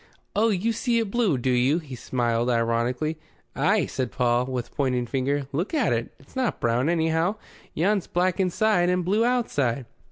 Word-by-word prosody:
"Oh, 225 +2 +3
you 215 +3 0
see 235 +1 0
it 225 -4 -1
blue, 220 - +2
do 125 +1 0
you?" 125 +5 +3
He 150 -6 -8
smiled 120 -1 -1
ironically. 120 +6 0 0.4
"Ay," - - +2
said 130 -3 -3
Paul, 125 0 +1
with 125 -2 -4
pointing 125 -3 0
finger. 135 +3 -1
"Look 170 - -2
at 265 - +2
it. 115 0 -2
It's 135 - -21
not 260 -3 -1
brown, 120 +5 +1
anyhow. 165 +3 +1 0.4
Yon's 195 +4 +1
black 180 +1 0
inside 185 0 +2
and 180 -1 +1
blue 205 +5 +2
outside." 145 - 0
155 Hz, 170 wpm, -25 LUFS, 125-195 Hz, 0.4 s, Oh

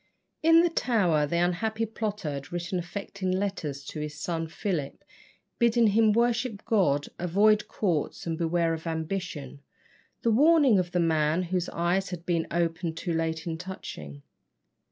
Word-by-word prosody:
In 330 +1 +6
the 345 - +3
Tower 180 - +2
the 170 - -1
unhappy 215 +6 0
plotter 210 -6 -3
had 140 -1 -7
written 175 +1 -2
affecting 190 +2 -5
letters 185 -8 -2
to 155 - -6
his 150 0 -5
son 165 0 -2
Philip, 160 -4 -3 0.6
bidding 235 0 +4
him 220 +1 +4
worship 235 -1 0
God, 175 - +2
avoid 205 +5 +3
courts, 170 -8 -2
and 165 -1 -1
beware 165 0 +1
of 160 +1 -6
ambition. 160 -4 -4 0.6
The 230 - +3
warning 285 - +5
of 175 -1 -2
the 180 - +1
man 160 0 +2
whose 180 0 -2
eyes 175 +3 0
had 175 -2 -7
been 170 -2 0
opened 165 -1 -1
too 175 -1 -2
late 160 -1 -1
is 165 -2 -3
touching. 75 - -8
175 Hz, 155 wpm, -27 LUFS, 160-210 Hz, 0.6 s, In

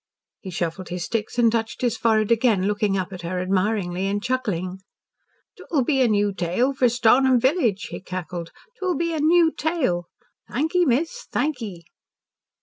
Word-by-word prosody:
He 190 - -8
shuffled 175 +1 -4
his 175 -1 -3
sticks 225 0 -3
and 235 -2 +4
touched 225 -1 -2
his 240 -2 +1
forehead 220 -2 +2
again, 225 -5 +3
looking 205 -1 +1
up 185 +1 -3
at 180 - -7
her 175 +2 -3
admiringly 185 0 0
and 200 +1 0
chuckling. 205 -7 -2 0.8
"'T'will 290 -6 -1
be 270 -2 +2
a 250 - +5
new 205 -2 +1
tale 190 +9 0
for 255 -2 +3
Stornham 250 +2 +4
village," 250 - +1
he - - -6
cackled. 175 -2 -6 0.3
"'T'will 370 -2 -1
be 335 0 -1
a 315 - -2
new 325 +2 +4
tale. 280 - -1 0.4
Thank 305 +6 -1
ye, 360 -1 +4
miss. 325 - -1
Thank 290 -4 -1
ye." 185 -6 -7
220 Hz, 170 wpm, -23 LUFS, 185-265 Hz, 0.8 s, a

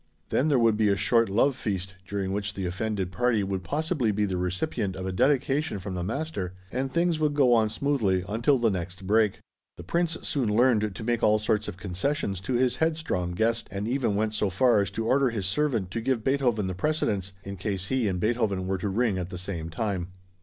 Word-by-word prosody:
Then 145 - +2
there 145 -4 +3
would 115 -3 +3
be 110 -1 +3
a 100 - +3
short 115 +2 +2
love 120 +7 +3
feast, 95 -5 -3
during 100 -1 -2
which 100 0 -3
the 95 - -3
offended 95 +1 -2
party 115 +2 +1
would 95 -1 -3
possibly 145 - 0
be 105 +1 +1
the 95 -2 -2
recipient 90 +2 -2
of 95 - -5
a 95 - -2
dedication 140 +5 +1
from 95 0 -6
the 90 -1 -3
master, 105 - -3 0.2
and 135 +1 -2
things 170 0 +1
would 150 -2 +1
go 130 -4 +5
on 110 -2 +4
smoothly 110 -9 +1
until 115 +6 +2
the 115 -3 +2
next 90 +1 -5
break. 105 0 +3 0.4
The 85 - -8
Prince 170 - 0
soon 120 -7 0
learned 110 -4 +3
to 110 - -6
make 120 0 0
all 105 0 +4
sorts 105 0 0
of 90 - -6
concessions 95 +1 -2
to 125 - -3
his 125 0 +2
headstrong 155 - -1
guest, 115 +4 0
and 100 +2 -4
even 120 -4 0
went 110 +1 0
so 105 -2 0
far 120 +2 +4
as 100 - -1
to 115 - -3
order 135 +2 +3
his 105 -5 -3
servant 110 -3 0
to 115 - -2
give 120 -2 0
Beethoven 125 -6 +1
the 95 - -2
precedence, 100 -5 -1
in 100 0 -6
case 95 0 -3
he 130 -4 +1
and 90 -2 -1
Beethoven 105 -3 0
were 95 0 -1
to 100 - -2
ring 105 -1 +1
at 90 0 -4
the 90 - -6
same 85 -3 -4
time. 95 0 -2
105 Hz, 220 wpm, -27 LUFS, 95-125 Hz, 0.4 s, go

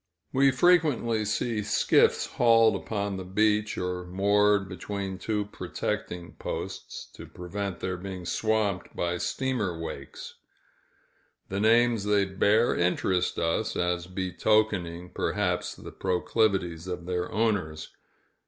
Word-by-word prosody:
We 135 +1 +5
frequently 135 -7 +3
see 110 +1 -1
skiffs 105 0 +3
hauled 115 -3 +4
upon 100 -1 -3
the 95 - -5
beach, 105 +3 +1
or 90 0 -2
moored 100 +2 +3
between 95 0 -5
two 105 +1 -1
protecting 90 -3 -4
posts, - - -6
to - - -10
prevent 95 +1 -5
their 95 -1 -2
being 95 -1 -7
swamped 105 -1 -1
by 85 0 -1
steamer 110 -11 -1
wakes. 70 -4 -7 1.1
The 95 - -2
names 115 0 +4
they 105 -1 +3
bear 105 +4 +2
interest 90 +1 +1
us, 85 0 0
as 90 0 -1
betokening, 90 -1 0
perhaps, - - -1
the - - -10
proclivities 95 -2 0
of 90 -2 -5
their 90 0 -2
owners. 100 -9 -1
100 Hz, 115 wpm, -27 LUFS, 90-110 Hz, 1.1 s, We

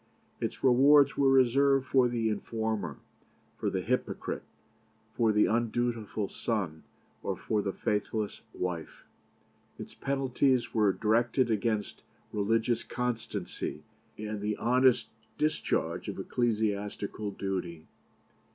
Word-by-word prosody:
Its - - -4
rewards 135 +2 +6
were 140 -1 +4
reserved 135 +1 +4
for 130 -2 +4
the 120 -2 0
informer, 110 0 -2 0.6
for - - 0
the - - -1
hypocrite, - - -2 0.7
for 115 -2 +3
the 105 0 +4
undutiful 115 -2 -1
son, 95 -10 -3 0.4
or - - -2
for 105 -1 0
the 100 - -2
faithless 105 +1 -2
wife. 90 -3 -5 0.7
Its - - -9
penalties 135 -2 +1
were 105 -3 +4
directed 115 +4 +2
against 110 -1 -1 0.3
religious 115 +3 +1
constancy 115 -6 -4 0.3
and 105 -1 -4
the 105 0 -1
honest 125 +1 +3 0.3
discharge 155 0 0
of - - -4
ecclesiastical 105 -3 -1
duty. 90 -5 -4
110 Hz, 105 wpm, -30 LUFS, 105-125 Hz, 0.7 s, rewards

